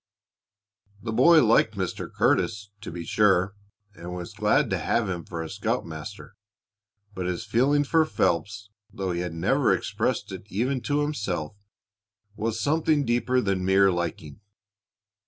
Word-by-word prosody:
The 115 - -3
boy 155 +8 +6
liked 110 0 +3
Mr. 95 -2 -4
Curtis, 105 -2 0
to 110 - -7
be 85 0 -6
sure, 100 -2 +3 0.4
and 90 -2 -8
was 90 -1 -7
glad - - +2
to - - 0
have 115 -3 0
him 90 -3 -3
for 85 -2 -5
a - - -6
scoutmaster, 85 +7 -4 0.8
but 95 -2 -4
his 90 -1 -3
feeling 140 +5 +2
for 160 +3 +3
Phelps, 100 - -1 0.2
though 95 -1 -3
he 85 - -2
had 90 -2 -4
never 80 - +2
expressed - - -1
it 100 - -8
even 125 +7 -1
to 145 +5 0
himself, 100 - -3 0.8
was 110 +1 -2
something 150 +1 +1
deeper 125 +2 +1
than 95 -3 -1
mere 95 +1 +4
liking. 85 -2 -4
100 Hz, 145 wpm, -26 LUFS, 90-120 Hz, 0.8 s, boy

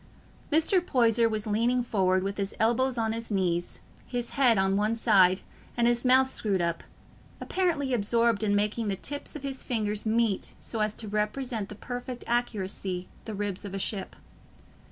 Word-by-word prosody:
Mr. 325 +4 +4
Poyser 230 -6 +3
was 215 0 -1
leaning 235 +4 +1
forward, 185 -5 +1
with 195 +1 -3
his 200 -1 -2
elbows 240 +3 +2
on 225 -1 0
his 230 0 -5
knees, 180 -4 -1 0.3
his 245 -1 -3
head 250 -5 +4
on 190 0 +2
one 210 +3 +1
side, 195 -5 +4 0.4
and 235 - +3
his 240 0 +2
mouth 260 +1 +5
screwed 205 -7 -1
up—apparently 275 - -3
absorbed 230 0 +2
in 205 -2 +2
making 210 +2 0
the 200 - 0
tips 285 +11 -3
of 295 - -7
his 270 -1 -2
fingers 215 -3 -1
meet 220 -2 0
so 225 - -3
as 215 0 0
to 220 - -4
represent 210 +1 -2
with 210 - -11
perfect 245 0 -6
accuracy 195 -6 -2 0.2
the 220 - -5
ribs 205 -1 -3
of 200 -1 -6
a - - -2
ship. 195 0 -3
220 Hz, 170 wpm, -28 LUFS, 200-245 Hz, 0.4 s, mouth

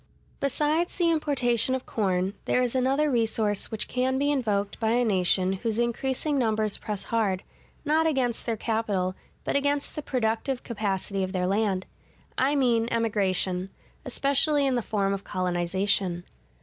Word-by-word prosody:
Besides 300 +5 0
the 340 -2 +2
importation 260 -6 +2
of 260 - -5
corn, 190 -2 0
there 250 - +2
is 245 - -1
another 270 +3 +2
resource 220 -4 +1
which 220 - -2
can 260 +1 0
be 285 +2 +2
invoked 210 -7 -1
by 220 0 +1
a 245 0 +2
nation 185 -2 +2
whose 225 -2 -1
increasing 265 +4 0
numbers 215 -3 0
press 210 -2 -4
hard, 210 -5 0 0.4
not 315 +2 +3
against 255 -7 -1
their 230 -1 0
capital, 210 -5 -1 0.3
but - - -2
against 285 0 0
the 300 - -3
productive 250 0 -1
capacity 200 -3 -2
of 185 +1 -4
their 180 -1 0
land: 195 -1 0 0.5
I 275 +3 +2
mean 235 -4 +2
Emigration, 195 -5 0 0.3
especially 280 +3 +3
in 270 - +2
the 245 - +1
form 200 -3 0
of 195 0 -4
Colonization. 180 0 0
230 Hz, 150 wpm, -26 LUFS, 195-265 Hz, 0.5 s, not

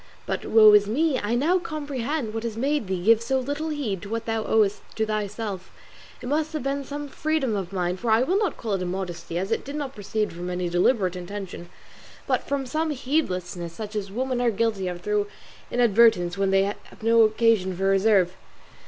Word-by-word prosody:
But, - - -3
woe 215 -1 +8
is 205 -1 +6
me, 275 +5 +1
I 210 +3 -1
now 330 +9 +2
comprehend 290 -6 -3
what 225 - -3
has 225 -1 -4
made 280 -1 0
thee 185 -2 -2
give 225 +2 +5
so 265 +3 0
little 285 +5 -3
heed 245 - -3
to 200 - -8
what 230 +1 -3
thou 225 -1 -1
owest 210 -2 +2
to 220 - +1
thyself; 210 -2 -4 0.5
it - - -5
must 310 +3 0
have 310 - -3
been 275 +1 -1
some 290 +2 -6
freedom 295 -5 -1
of 190 -3 -4
mine, 180 -1 -1
for 235 +4 -3
I 220 +3 +4
will 370 +8 +1
not 410 -8 -1
call 220 -4 -3
it 190 - -1
immodesty, 175 -2 -4
as 190 +4 -2
it 225 - 0
did 280 +2 -7
not 285 -3 -4
proceed 210 -1 -2
from 175 +1 -5
any 180 -1 -2
deliberate 185 +1 +2
intention, 180 -1 -7 0.6
but - - -1
from 275 -1 -1
some 310 +5 -1
heedlessness 185 - -2
such 215 +2 -7
as 200 -2 -3
women 255 +3 -1
are 245 - +3
guilty 215 -3 0
of 175 -1 -5
through 210 +1 0 0.4
inadvertence 225 -7 +4
when 195 -1 +1
they 195 0 +4
think 200 +1 -2
they - - -19
have - - -16
no 230 0 +5
occasion 215 -4 +3
for 190 - -3
reserve. 195 -2 +3
220 Hz, 210 wpm, -25 LUFS, 195-265 Hz, 0.6 s, woe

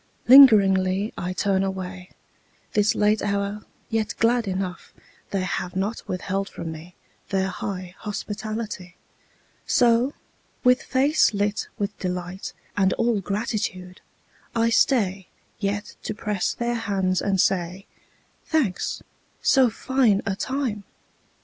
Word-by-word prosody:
Lingeringly 200 -6 +7
I 180 - -3
turn 190 0 +1
away, 185 -1 -4 0.6
This 210 0 +3
late 210 +1 +2
hour, 200 +1 -2 0.3
yet 220 -2 -1
glad 235 -1 +2
enough 185 -2 -4 0.3
They 195 -2 -1
have 180 -1 -3
not 200 +4 -3
withheld 195 +2 -2
from 165 -1 -6
me 160 +3 -10 0.3
Their 190 -1 0
high 185 -1 -5
hospitality. 210 -2 -5 0.7
So, 240 +2 +3 0.5
with 250 0 +5
face 275 -3 +2
lit 205 +1 -1
with 205 -1 -2
delight 180 +1 -4 0.2
And 190 -2 +3
all 230 -3 +1
gratitude, 195 -3 -3 0.5
I 230 0 +2
stay 195 -7 +2 0.3
Yet 205 0 -3
to 215 - -4
press 210 -3 -2
their 240 0 -1
hands 195 -5 0
and 195 -2 0
say, 180 +1 0 0.6
"Thanks. 260 - 0 0.4
So 265 -3 +5
fine 235 -3 +1
a 195 -3 -1
time 255 -3 -2
200 Hz, 120 wpm, -24 LUFS, 185-225 Hz, 0.7 s, Lingeringly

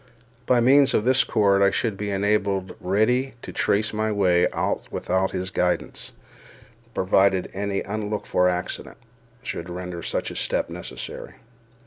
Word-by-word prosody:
By 125 -1 +4
means 135 +3 +5
of 105 - +2
this 130 +1 +5
cord 100 -3 +2
I 100 - +6
should 105 +1 -1
be 105 +1 -4
enabled 100 -1 0
readily 115 +8 +1
to - - -7
trace 105 +2 +1
my 110 0 0
way 90 -4 +3
out - - -2
without 95 +1 0
his 95 0 -4
guidance, 90 -1 -1 0.8
provided 95 0 +2
any 100 0 -2
unlooked 105 +1 -3
for 90 0 +2
accident 90 0 -4 0.5
should 85 -7 -5
render 90 -1 -6
such - - -3
a - - -8
step - - -1
necessary. - - -7
100 Hz, 145 wpm, -24 LUFS, 95-110 Hz, 0.8 s, I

